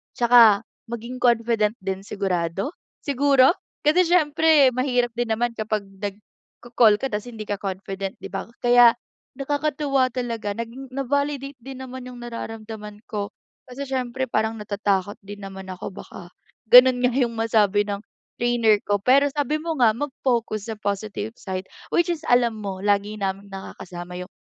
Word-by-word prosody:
Tsaka 235 -4 +6 0.3
maging 235 +2 -6
confident 230 -3 +2
din 190 0 -2
sigurado, 190 - -2 0.3
siguro, 275 -1 +4 0.3
kasi 340 +5 +4
siyempre 315 -4 +5
mahirap 250 -1 +1
din 240 -2 0
naman 240 +1 0
kapag 215 -1 -1 0.2
nagko-call 210 +2 0
ka 270 - -1
tas 210 +1 -3
hindi 225 -3 -7
ka 205 - -1
confident, 195 0 -4
di - - -6
ba? - - -4 0.2
Kaya 240 -1 +7 0.4
nakakatuwa 280 -2 0
talaga 230 -5 -3
naging 240 +4 -7
na-validate 280 +1 -2
din 265 +2 -9
naman 260 -1 -8
'yung 250 -1 -9
nararamdaman 220 -3 -7
ko. 205 -1 -4 0.3
Kasi 265 +2 -7
siyempre 260 -1 -2
parang 220 0 0
natatakot 200 -1 -1
din 205 +1 -9
naman 190 -1 -8
ako 185 - -6
baka 180 -2 -11 0.4
gano'n 250 +1 +8
nga 250 0 +3
'yung 240 -3 +1
masabi 215 -3 +2
ng 200 -1 -2 0.4
trainer 235 -3 +3
ko. 205 0 +1
Pero 265 +6 +5
sabi 295 +1 0
mo 325 +1 -3
nga, 225 -3 +6
mag-focus 235 -6 -2
sa - - -4
positive 205 +1 -3
side 190 -1 -5 0.3
which 345 0 +3
is 320 - -8
alam 240 -3 +3
mo 195 -2 -4
lagi 205 +1 +1
naming 195 0 -3
nakakasama 180 -2 -8
'yung 180 - -8
230 Hz, 150 wpm, -23 LUFS, 205-260 Hz, 0.4 s, gano'n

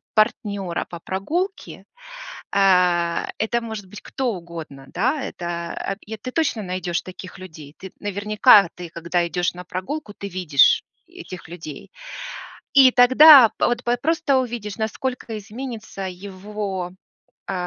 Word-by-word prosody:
партнера 205 -5 0
по 170 - -8
прогулке. 330 - -4 0.7
Э, 180 -3 +3
это 235 +2 0
может 220 -3 -6
быть 210 +3 -11
кто 255 -3 -2
угодно, 165 -6 -9
да. 255 - 0
Это, 175 +1 -4
э 220 +1 -7
ты 255 +5 -7
точно 285 -7 0
найдешь 180 -1 -2
таких 185 0 -10
людей. 155 -6 -11
Ты, 190 - -10
наверняка 205 0 +4
ты, 175 -1 -8
когда 170 +1 -1
идешь 175 +1 -1
на 180 0 -9
прогулку, 205 - -5
ты 200 - -6
видишь 175 -8 +3 0.2
этих 180 -4 -10
людей. 160 -4 -9 0.8
И 265 -2 +8
тогда 260 +1 +9
пт 240 +2 -1
вот 240 0 0
просто 325 -3 +2
увидишь, 235 -5 -3
насколько 225 +1 -3
изменится 220 0 -8
его, 190 0 -6 0.6
э, - - -2
200 Hz, 130 wpm, -22 LUFS, 180-240 Hz, 0.8 s, тогда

